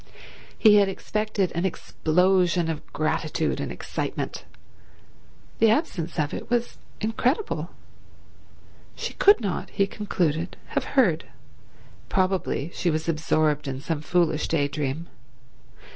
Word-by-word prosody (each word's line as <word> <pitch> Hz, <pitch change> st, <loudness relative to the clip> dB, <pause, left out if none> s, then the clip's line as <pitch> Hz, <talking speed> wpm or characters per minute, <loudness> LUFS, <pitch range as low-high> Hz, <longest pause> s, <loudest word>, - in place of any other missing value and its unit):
He 210 Hz, -2 st, +7 dB
had 200 Hz, -1 st, +4 dB
expected 210 Hz, 0 st, -1 dB
an 170 Hz, -, -2 dB
explosion 180 Hz, -1 st, +2 dB
of 155 Hz, -, -8 dB
gratitude 155 Hz, 0 st, -1 dB
and -, -, -3 dB
excitement. -, -, -4 dB, 1.1 s
The 225 Hz, -, +6 dB
absence 205 Hz, -, 0 dB
of 150 Hz, -2 st, 0 dB
it -, -, -6 dB
was 240 Hz, 0 st, -1 dB, 0.2 s
incredible. 245 Hz, -, 0 dB, 1.3 s
She -, -, -4 dB
could 405 Hz, -5 st, +5 dB
not, 200 Hz, -5 st, -2 dB
he 195 Hz, -, +1 dB
concluded, 175 Hz, -5 st, -2 dB
have -, -, -1 dB
heard. 175 Hz, -11 st, +4 dB, 0.8 s
Probably 185 Hz, -5 st, 0 dB
she 175 Hz, -, 0 dB
was 160 Hz, 0 st, -1 dB
absorbed 155 Hz, -2 st, +1 dB
in 135 Hz, -1 st, -3 dB
some 150 Hz, +1 st, -3 dB
foolish 165 Hz, -1 st, +1 dB
day 145 Hz, -3 st, +1 dB
dream. 145 Hz, +3 st, -3 dB
175 Hz, 115 wpm, -25 LUFS, 155-205 Hz, 1.3 s, He